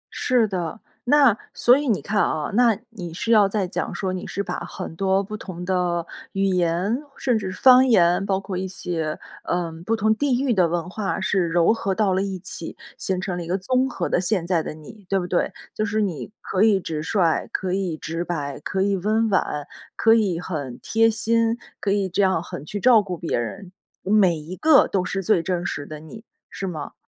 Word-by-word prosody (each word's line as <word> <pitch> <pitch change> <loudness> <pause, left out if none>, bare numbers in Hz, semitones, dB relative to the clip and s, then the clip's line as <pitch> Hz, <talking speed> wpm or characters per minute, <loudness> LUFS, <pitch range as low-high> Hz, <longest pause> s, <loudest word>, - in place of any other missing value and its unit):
是 245 -3 +2
的。 180 0 -4 0.3
那， 270 -5 +5 0.2
所 245 +2 +5
以 290 -1 -2
你 215 - +1
看 205 0 0
啊， 150 -1 -1
那 230 -1 +4
你 175 -7 -7
是 225 +7 -4
要 205 -3 +6
在 195 -3 -1
讲 - - -3
说， 190 -2 -2
你 185 - -5
是 200 - -3
把 - - -4
很 160 - -7
多 195 +1 +2
不 210 +2 -6
同 180 -4 -7
的 180 -2 0 0.3
语 195 0 0
言， 180 +4 +1 0.2
甚 250 -4 +1
至 190 -3 -4
方 255 +7 +6
言， 180 -5 +4
包 195 -1 0
括 195 -2 -5
一 190 - -2
些， 165 -4 -3 0.2
呃， 175 -1 -1 0.2
不 225 0 +1
同 220 +1 +2
地 260 0 +1
域 265 -3 +2
的 180 -5 +3
文 175 +1 -2
化 195 -1 -2
是 190 -3 +1
糅 175 +5 +4
合 195 -4 -1
到 200 -2 +1
了 190 - +1
一 195 -2 -3
起， 170 -2 -7 0.2
形 185 -1 -2
成 185 -1 -3
了 175 - -4
一 - - -9
个 185 +2 0
综 255 +7 +1
合 - - -3
的 180 - +1
现 180 -2 0
在 170 -3 +1
的 - - -5
你， 185 +6 -13
对 195 -1 +2
不 180 - -4
对？ 175 - 0 0.2
就 215 - -2
是 215 +1 -1
你 180 -5 -2
可 190 - 0
以 210 -3 +4
直 155 -3 -4
率， 170 -2 +1
可 185 -1 -2
以 185 -5 -1
直 165 +2 -4
白、 145 -6 -4
可 190 +5 -2
以 200 0 +2
温 215 +4 +1
婉、 150 -6 0 0.3
可 225 - +5
以 200 -7 +2
很 145 -8 -5
贴 225 0 +3
心、 230 +1 +1 0.2
可 200 - 0
以 200 -1 +1
这 185 +3 0
样 190 -4 +2
很 145 - -8
去 205 +6 -5
照 235 0 +6
顾 185 -4 -5
别 165 - -2
人， 180 - -5 0.3
每 190 -4 +3
一 160 +5 -8
个 310 +3 +5
都 190 -2 0
是 195 +1 -2
最 185 -3 +2
真 180 -2 -2
实 145 - -3
的 155 -1 -8
你， 215 +8 -11 0.3
是 195 - -6
吗？ 160 -6 -5
190 Hz, 235 characters per minute, -23 LUFS, 175-215 Hz, 0.3 s, 要